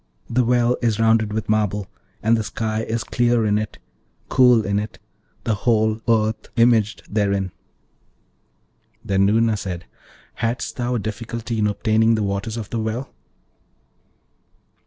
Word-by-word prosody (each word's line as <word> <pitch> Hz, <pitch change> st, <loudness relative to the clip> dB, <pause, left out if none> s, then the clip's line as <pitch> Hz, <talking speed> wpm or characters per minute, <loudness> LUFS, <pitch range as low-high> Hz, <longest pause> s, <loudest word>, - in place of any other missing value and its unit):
The 125 Hz, +2 st, +2 dB
well 120 Hz, 0 st, +2 dB
is 115 Hz, -3 st, +1 dB
rounded 110 Hz, -1 st, +3 dB
with 110 Hz, 0 st, -3 dB
marble, 105 Hz, -2 st, 0 dB, 0.4 s
and 110 Hz, +2 st, +4 dB
the 110 Hz, -, -1 dB
sky 110 Hz, 0 st, -2 dB
is 115 Hz, 0 st, -2 dB
clear 120 Hz, -2 st, +1 dB
in 105 Hz, 0 st, +2 dB
it, 110 Hz, 0 st, -5 dB, 0.5 s
cool 125 Hz, -4 st, +5 dB
in 100 Hz, -1 st, +1 dB
it, 105 Hz, +1 st, -6 dB, 0.5 s
the 115 Hz, -, 0 dB
whole 110 Hz, 0 st, +1 dB
earth 110 Hz, -1 st, +1 dB
imaged 115 Hz, -2 st, +3 dB
therein.' 100 Hz, -3 st, 0 dB, 1.5 s
Then 95 Hz, 0 st, +3 dB
Noorna 110 Hz, +1 st, +3 dB
said, 90 Hz, -4 st, -5 dB, 0.5 s
'Hadst 115 Hz, +2 st, -2 dB
thou 125 Hz, 0 st, -1 dB
a -, -, 0 dB
difficulty 115 Hz, +2 st, -4 dB
in 105 Hz, -, +3 dB
obtaining 110 Hz, +2 st, +2 dB
the 110 Hz, -, -1 dB
waters 100 Hz, +3 st, -2 dB
of 110 Hz, -3 st, -6 dB
the 115 Hz, -, -1 dB
well?' 110 Hz, +4 st, -3 dB
110 Hz, 140 wpm, -22 LUFS, 105-115 Hz, 1.5 s, cool